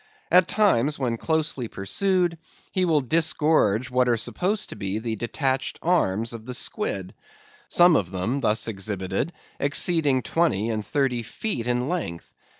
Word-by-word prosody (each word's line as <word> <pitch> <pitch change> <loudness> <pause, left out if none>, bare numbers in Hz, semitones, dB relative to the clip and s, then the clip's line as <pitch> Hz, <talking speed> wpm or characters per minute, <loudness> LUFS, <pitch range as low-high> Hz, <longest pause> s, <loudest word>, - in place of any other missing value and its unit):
At 180 0 +6
times, 150 - +2
when 120 -4 -1
closely 155 -4 -1
pursued, 175 - 0 0.3
he 185 -2 +1
will 160 -4 +2
disgorge 150 -5 +2
what 125 0 +2
are 120 - +2
supposed 195 - -1
to - - -7
be 95 +1 -3
the 110 0 -3
detached 130 +4 -2
arms 115 - +1
of 115 0 -9
the 125 - -3
squid; 100 - -2 0.6
some 175 -1 +6
of 90 -9 +1
them 100 +9 -2
thus 110 -2 +1
exhibited 95 - -3 0.3
exceeding 145 -2 +2
twenty 115 - +1
and 110 -1 -2
thirty 125 +2 0
feet 120 - -3
in 125 +1 0
length. 145 - -4
125 Hz, 150 wpm, -24 LUFS, 110-165 Hz, 0.6 s, At